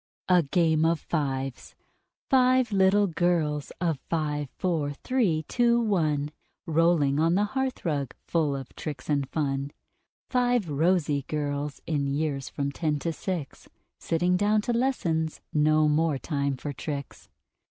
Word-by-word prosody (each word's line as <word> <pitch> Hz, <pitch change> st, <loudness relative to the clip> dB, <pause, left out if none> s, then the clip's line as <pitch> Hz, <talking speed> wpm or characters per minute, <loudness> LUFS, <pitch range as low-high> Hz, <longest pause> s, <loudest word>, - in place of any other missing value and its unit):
Five 160 Hz, -5 st, +1 dB, 1.2 s
little 200 Hz, +1 st, +4 dB
girls, 165 Hz, -5 st, 0 dB
of 165 Hz, -6 st, 0 dB
Five, 150 Hz, -3 st, -1 dB
Four, 160 Hz, -6 st, -1 dB
Three, 180 Hz, -, 0 dB
Two, 240 Hz, -1 st, +3 dB
One: 155 Hz, -10 st, 0 dB, 0.3 s
Rolling 160 Hz, -3 st, +2 dB
on 165 Hz, +2 st, +3 dB
the 205 Hz, -, +3 dB
hearthrug, 175 Hz, -, -2 dB
full 155 Hz, -4 st, +1 dB
of 135 Hz, -2 st, -8 dB
tricks 150 Hz, -1 st, -6 dB
and 140 Hz, -2 st, 0 dB
fun. 140 Hz, -2 st, -1 dB, 0.6 s
Five 245 Hz, -5 st, +1 dB
rosy 150 Hz, -1 st, +2 dB
girls, 145 Hz, -1 st, -3 dB
in 145 Hz, -3 st, -1 dB
years 140 Hz, -1 st, -2 dB
from 140 Hz, -1 st, -3 dB
Ten 150 Hz, 0 st, -1 dB
to 165 Hz, +3 st, -2 dB
Six: 165 Hz, -4 st, -5 dB, 0.3 s
Sitting 175 Hz, +2 st, +1 dB
down 210 Hz, +2 st, +2 dB
to 240 Hz, -, -1 dB
lessons 170 Hz, -11 st, 0 dB
no 155 Hz, 0 st, +4 dB
more 150 Hz, 0 st, +2 dB
time 140 Hz, -2 st, -2 dB
for 145 Hz, +2 st, -5 dB
tricks. 140 Hz, -1 st, -6 dB
155 Hz, 120 wpm, -27 LUFS, 145-180 Hz, 1.2 s, little